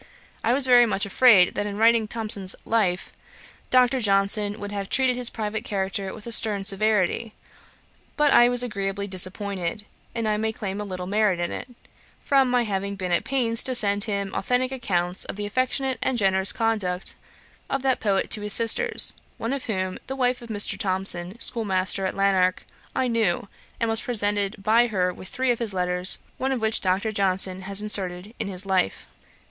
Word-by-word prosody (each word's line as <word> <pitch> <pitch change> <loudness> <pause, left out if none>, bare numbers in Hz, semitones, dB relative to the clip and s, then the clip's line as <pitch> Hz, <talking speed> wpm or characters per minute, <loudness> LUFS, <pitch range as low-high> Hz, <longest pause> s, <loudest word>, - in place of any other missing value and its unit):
I 230 - +1
was 270 +1 +4
very 245 -2 +5
much 205 -2 -1
afraid 200 -3 +5
that 205 - -3
in 200 0 -6
writing 225 0 +3
Thomson's 210 -4 +1
Life, 195 -5 -1 0.6
Dr. 255 +1 +3
Johnson 205 0 +2
would 205 0 -6
have 200 -1 -5
treated 260 -1 +1
his 245 -1 +3
private 215 0 -4
character 195 -1 -3
with 210 - -10
a 235 - -7
stern 210 -3 +3
severity, 215 +1 +1 0.8
but 295 -2 +3
I 240 0 +6
was 245 0 +2
agreeably 200 -3 -4
disappointed; 190 0 -1 0.3
and 230 -2 -2
I 210 0 0
may 220 +1 -2
claim 205 -2 -5
a - - -5
little 185 -2 -6
merit 205 -2 0
in 175 - -2
it, - - -7 0.5
from 270 -2 +2
my 245 -1 +1
having 200 -2 -3
been 185 -2 -5
at 175 - +1
pains 240 -4 +3
to 255 - 0
send 205 -3 +3
him 200 -3 -3
authentick 250 +5 -1
accounts 180 -8 -1
of - - -7
the 205 +1 -5
affectionate 255 +3 -1
and 260 - -1
generous 190 -2 +3
conduct 210 -5 -1 0.6
of 275 -1 -2
that 265 -2 +1
poet 200 -3 -1
to 210 - -1
his 210 -1 +1
sisters, 455 - +4 0.2
one 230 +4 -3
of 275 - -5
whom, 185 -4 -3
the 265 - -5
wife 250 -2 -1
of 235 - -12
Mr. 205 -2 0
Thomson, 185 +1 -2
schoolmaster 195 -5 0
at - - -5
Lanark, 190 -2 +1 0.3
I 260 - 0
knew, 220 -6 0 0.3
and 230 - 0
was 225 0 +1
presented 205 -3 0
by 230 +3 +3
her 180 -5 -1
with 185 - -10
three 260 -1 0
of 235 - -2
his 220 -5 -3
letters, 180 0 +1 0.2
one 265 +1 -1
of 260 - -1
which 220 0 -1
Dr. 190 +4 0
Johnson 190 -2 +1
has 195 +2 0
inserted 195 -1 +2
in - - -3
his 190 0 -2
Life. 190 - -1
205 Hz, 185 wpm, -24 LUFS, 190-235 Hz, 0.8 s, I